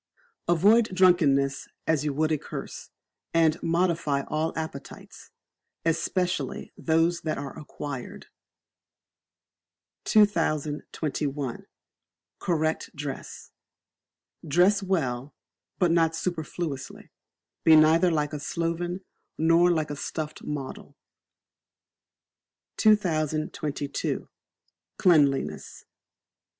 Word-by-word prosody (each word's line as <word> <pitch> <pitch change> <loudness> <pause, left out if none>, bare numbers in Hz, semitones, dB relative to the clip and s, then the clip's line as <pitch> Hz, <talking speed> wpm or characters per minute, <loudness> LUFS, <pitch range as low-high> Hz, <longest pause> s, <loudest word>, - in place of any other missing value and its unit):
Avoid 205 +7 +4
Drunkenness 145 -7 +3 0.2
as 160 -3 +1
you 150 - 0
would 155 +3 0
a 155 - +2
curse; - - -8 0.5
and 165 -1 +3
modify 170 -4 +1
all 155 +3 -1
appetites, 160 -4 -8 0.6
especially 175 +2 -1
those 165 +1 +1
that 155 - -2
are 140 -1 -6
acquired. 145 -3 -7 1.8
2021. 150 - 0 0.7
Correct 160 -2 -1
Dress. 140 -1 -7 1.0
Dress 185 +7 +4
Well, 145 -9 -2 0.4
but 180 -3 +3
not 165 -1 +3
superfluously; 160 -4 -4 0.5
be 160 - +7
neither 160 +3 +5
like 150 -2 0
a 150 - -3
sloven, 170 +4 -3 0.3
nor 165 +2 +4
like 155 -3 0
a - - -3
stuffed 155 +1 -5
model. 140 -3 -6 1.8
2022. 155 -7 0 0.7
Cleanliness. 145 -7 +2
160 Hz, 80 wpm, -26 LUFS, 145-175 Hz, 1.8 s, be